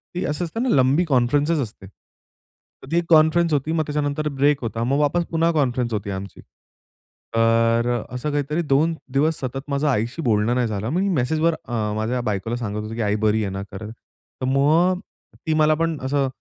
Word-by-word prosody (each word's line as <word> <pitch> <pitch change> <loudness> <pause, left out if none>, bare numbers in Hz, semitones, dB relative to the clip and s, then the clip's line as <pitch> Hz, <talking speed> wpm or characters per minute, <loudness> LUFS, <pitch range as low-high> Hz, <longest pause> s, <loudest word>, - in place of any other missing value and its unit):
ती 180 - -2
असं 150 +4 -2
असतं 225 +9 -3
ना 260 - 0
लंबी 135 +5 +3
कॉन्फरन्सस 145 +3 +2
असते. 105 -4 -7
तर 105 - -24
ती 170 - +2
एक 170 - +1
कॉन्फरन्सस 160 +1 +4
होती, 145 +2 0
मग 160 -1 +1
त्याच्यानंतर 150 0 -1
ब्रेक 140 0 +1
होता. 115 0 -2
मग 135 +4 +1
वापस 170 +4 +1
पुन्हा 165 0 +2
कॉन्फरन्स 125 -6 0
होती 105 -1 -3
आमची. 95 0 -7 0.9
तर 115 +1 +3 0.2
असं 125 +4 -3
काहीतरी 145 +3 -1
2 155 +2 +2 0.2
दिवस 150 +3 +2
सतत 135 +1 -4
माझ्या 140 +1 +1
आईशी 120 +7 -2
बोलणं 115 -3 +1
नाही 125 -1 +1
झालं. 105 0 -3
मी 185 +7 0
मेसेजवर 160 +1 +1
अ, 110 -3 -2
माझ्या 115 +4 -1
बायकोला 110 0 -2
सांगत 105 -3 -4
होतो, 110 +1 -6
की 115 - -3
आई 105 -1 +1
बरी 110 +1 +2
आहे 100 - -3
ना? 95 0 -4
तर 105 +2 -7 0.6
मग 160 +7 +3 0.5
ती 160 - +2
मला 155 0 +4
पण 165 0 -1
असं 135 +1 +1
135 Hz, 185 wpm, -22 LUFS, 115-155 Hz, 0.9 s, कॉन्फरन्सस